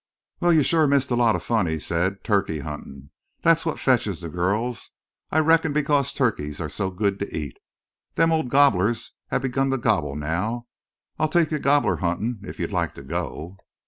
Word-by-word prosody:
"Wal, 175 0 +3
you've 155 -4 +4
shore 160 -2 +3
missed 140 -2 +2
a - - +3
lot 120 -2 +3
of - - -4
fun," 110 -6 +1
he 80 0 -1
said. 95 +5 -1
"Turkey 100 -8 0
huntin'. 70 -2 -8 0.3
Thet's 165 0 +4
what 160 - -1
fetches 110 - +1
the 85 -2 -6
gurls. 105 +8 -1 0.4
I - - -1
reckon 160 -1 +3
because 145 -2 +1
turkeys 75 - -1
are - - -3
so 95 -2 -2
good 100 +1 -1
to 100 - -4
eat. 75 -5 -6 0.6
The 165 - +4
old 160 -5 +1
gobblers 120 -6 +3 0.2
hev 130 - -1
begun 135 +1 0
to 135 - +1
gobble 80 - 0
now. 90 +11 -2 0.5
I'll 155 0 +2
take 165 0 +2
you 155 - 0
gobbler 140 -11 +2
huntin' 100 +6 -2
if - - -9
you'd - - -3
like - - -1
to 70 - -10
go." 85 +3 -5
110 Hz, 190 wpm, -24 LUFS, 85-140 Hz, 0.6 s, you've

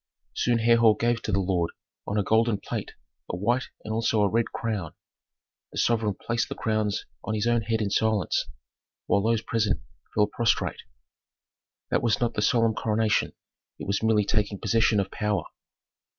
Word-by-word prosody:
Soon 120 -1 +1
Herhor 115 -1 +5
gave 120 0 +1
to - - -3
the 100 - +2
lord, 90 -3 0 0.4
on 100 - -1
a 105 - +2
golden 110 +1 +2
plate, - - -5 0.3
a - - -3
white 120 +7 +1 0.2
and 110 - -3
also 110 -1 +2
a - - +4
red 115 +3 +1
crown. 105 -8 -4 0.8
The - - -9
sovereign 110 -4 +1
placed 115 +3 -2
the - - -4
crowns 110 -3 -1 0.2
on 110 - -2
his 105 - -1
own 120 -1 +2
head 110 0 -1
in 100 - -2
silence, 110 -5 +1 0.6
while 100 - +2
those 115 +1 +1
present 105 - 0 0.4
fell 105 - +5
prostrate. 115 +2 0 1.1
That - - +2
was 115 -2 +1
not 120 -1 0
the 105 - -1
solemn 115 0 +3
coronation; 110 0 +1 0.4
it - - -7
was 100 0 0
merely 110 -2 +3
taking 105 -1 0
possession 110 +1 +2
of 100 -1 -2
power. 105 -5 -1
110 Hz, 170 wpm, -26 LUFS, 105-115 Hz, 1.1 s, Herhor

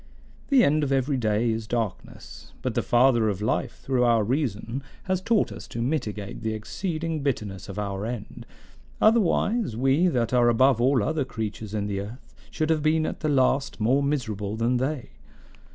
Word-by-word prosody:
"The 275 -3 +5
end 150 +1 +3
of 140 - -1
every 135 +1 +1
day 115 0 +1
is 110 -1 -3
darkness, 115 -5 -5
but - - -1
the - - +1
Father 120 -2 +3
of 100 -2 -2
life 105 - -2
through 130 -2 +1
our 115 -2 +4
reason 120 0 -2 0.2
has 185 -1 -1
taught 225 +1 +1
us - - -9
to 115 - -5
mitigate 105 -9 -3
the 110 0 -2
exceeding 160 - -3
bitterness 105 -10 -3
of 100 - -7
our 100 -1 -3
end; 115 -1 -6 0.5
otherwise, 220 - +2
we 135 +8 +3
that 125 -7 0
are 120 -1 +5
above 125 +1 +4
all 130 -2 +3
other 155 +2 0
creatures 110 -3 -5
in 105 -1 -1
the 100 -1 -2
earth 110 +6 -10 0.2
should 155 0 -1
have 155 -1 +2
been 155 +1 +2
at - - -4
the 155 - -1
last 135 -1 +1
more 125 +6 +3
miserable 110 -8 -2
than 115 +3 +1
they. 130 +1 -3
125 Hz, 180 wpm, -25 LUFS, 110-150 Hz, 0.5 s, The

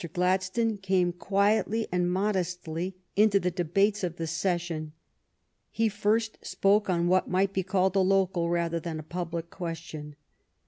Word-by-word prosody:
Gladstone 185 +5 +1
came 185 -2 +1
quietly 200 +5 +1
and 180 0 +1
modestly 180 -2 -2 0.2
into 205 -1 +5
the 180 -1 -1
debates 195 +4 +1
of 175 -2 -2
the 165 - -3
session. 165 -2 -2 0.8
He 225 0 +1
first 215 +2 0
spoke 200 +1 +2
on 170 -1 +1
what 185 +1 +2
might 190 +1 +1
be 190 - +1
called 190 0 +1
a - - +4
local 190 -2 +2
rather 170 -1 0
than 165 -1 -5
a 155 - -6
public 170 0 -5
question. 160 -4 -6
185 Hz, 145 wpm, -28 LUFS, 170-195 Hz, 0.8 s, into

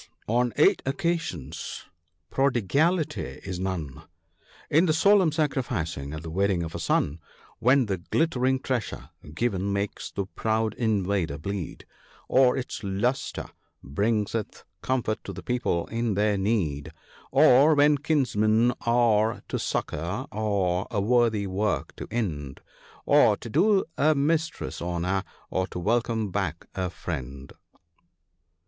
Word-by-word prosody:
on 120 +2 +2
eight - - +4
occasions 135 - -3 0.5
prodigality 140 - +1
is 90 -2 -5
none 80 -7 -4 0.3
— - - -44 0.3
In 160 +5 +5
the 155 - +3
solemn 190 0 +4
sacrificing, 110 - -2
at 80 +1 -6
the 80 - -6
wedding 95 0 +1
of 80 - -6
a - - -4
son, 75 +4 0 0.4
When 130 +2 +4
the 100 -3 -2
glittering 130 - +1
treasure 125 -5 -3 0.2
given 100 -3 0
makes 100 0 -3
the 100 - -3
proud 110 +2 -1
invader 100 - 0
bleed, 95 +3 -5 0.4
Or 130 0 +4
its 130 -3 -5
lustre 105 +7 -1 0.4
bringeth 105 +7 -1 0.2
comfort 125 -4 -1
to - - -6
the - - -9
people 120 -9 0
in 115 -2 -1
their 105 +1 +2
need, 95 -8 -1 0.4
Or 140 +5 +6
when 145 0 +4
kinsmen 120 -6 +2
are 115 -2 +2
to - - -2
succour, 85 +6 -2
or 100 -4 0
a 110 - -1
worthy 110 -1 +2
work 95 -5 -1
to - - -6
end, 75 - -3 0.4
Or - - +5
to - - -9
do 200 - +3
a 155 +1 +4
mistress 160 +3 -1
honour, 90 +3 -1 0.3
or 95 0 0
to - - -8
welcome 110 +2 0
back 90 -4 -2
a 95 -1 -2
friend." 70 -6 -6
110 Hz, 130 wpm, -26 LUFS, 95-130 Hz, 0.5 s, Or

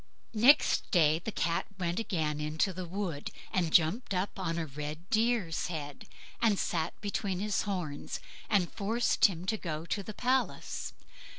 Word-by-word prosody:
Next 250 +7 +5
day 160 -3 +4
the 220 - -4
Cat 170 -4 0
went 175 0 -1
again 160 -9 -1
into 155 +5 0
the 180 0 -5
wood, 175 -5 -3 0.2
and 175 -4 +1
jumped 185 +7 +3
up 190 +2 -2
on 165 -3 -1
a 165 - -1
red 150 +4 -6
deer's 220 -7 +1
head, 145 -4 -6 0.3
and 220 -4 +4
sat 165 -2 -1
between 200 -2 -1
his 210 +1 0
horns, 170 -7 -3 0.3
and 195 -5 +2
forced 225 +3 +2
him 180 -3 +1
to 220 +3 0
go 160 -4 -4
to 200 - -1
the 210 +1 -8
palace. 255 +1 -1
180 Hz, 160 wpm, -31 LUFS, 160-205 Hz, 0.3 s, Next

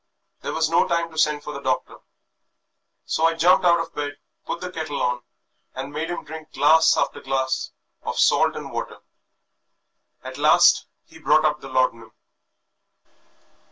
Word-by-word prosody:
There - - -4
was 160 0 +2
no 165 - +2
time 170 -1 -1
to 160 - -13
send 150 -1 +1
for 150 - -7
the 140 - -6
doctor, 130 -2 -2 1.1
so 160 - 0
I 165 0 +2
jumped 175 +4 +4
out 170 -1 +4
of 165 0 -5
bed, 145 -1 -4 0.3
put - - -3
the 180 0 -6
kettle 155 -4 -4
on, 125 0 -1 0.5
and 135 +2 -6
made 160 +3 -3
him 175 - -4
drink 160 0 -10
glass 160 +4 +4
after - - -1
glass 130 -1 -2 0.3
of - - -5
salt - - +3
and - - -7
water. - - -5 1.3
At - - -8
last - - +5 0.2
he 160 - -16
brought 155 0 +3
up 150 0 0
the 135 - -9
laudanum." 115 -4 -1
155 Hz, 160 wpm, -23 LUFS, 135-165 Hz, 1.3 s, last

